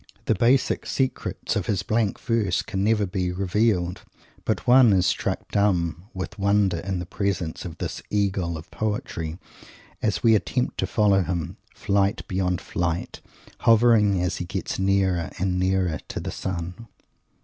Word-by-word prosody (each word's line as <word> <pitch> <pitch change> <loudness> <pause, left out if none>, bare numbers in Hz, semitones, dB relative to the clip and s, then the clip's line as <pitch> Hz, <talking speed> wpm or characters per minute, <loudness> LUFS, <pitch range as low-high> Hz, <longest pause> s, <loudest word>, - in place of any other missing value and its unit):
The - - +3
basic 120 +6 +2
secrets 130 -1 -2
of - - -1
his 100 -2 0
blank 110 -2 0
verse 110 -6 0
can 95 0 -2
never 105 -1 +2
be 90 -1 -2
revealed, 95 -1 0 0.4
but - - -1
one 125 -3 +7
is 95 -1 +3
struck - - -1
dumb 90 -4 +1
with 95 -1 -6
wonder 100 -2 +2
in 95 +1 -3
the 90 - -4
presence 90 -3 -2
of 85 -2 -7
this - - -4
Eagle 95 -5 0
of 80 - -11
Poetry 85 -6 -3 0.6
as 105 -2 0
we 115 -1 +6
attempt 125 +4 0
to - - 0
follow 100 -3 +3
him, 85 -2 -3 0.2
flight 100 +1 0
beyond 90 -3 -1
flight, 90 0 -3 0.4
hovering 115 -1 +5
beyond - - +1
hovering, 90 - 0
as 90 - -2
he 90 - -4
gets 95 +1 -4
nearer 95 -3 +1
and 90 0 0
nearer 95 -3 +1
to - - -5
the - - -4
Sun. 90 +5 -5
95 Hz, 160 wpm, -24 LUFS, 90-105 Hz, 0.6 s, one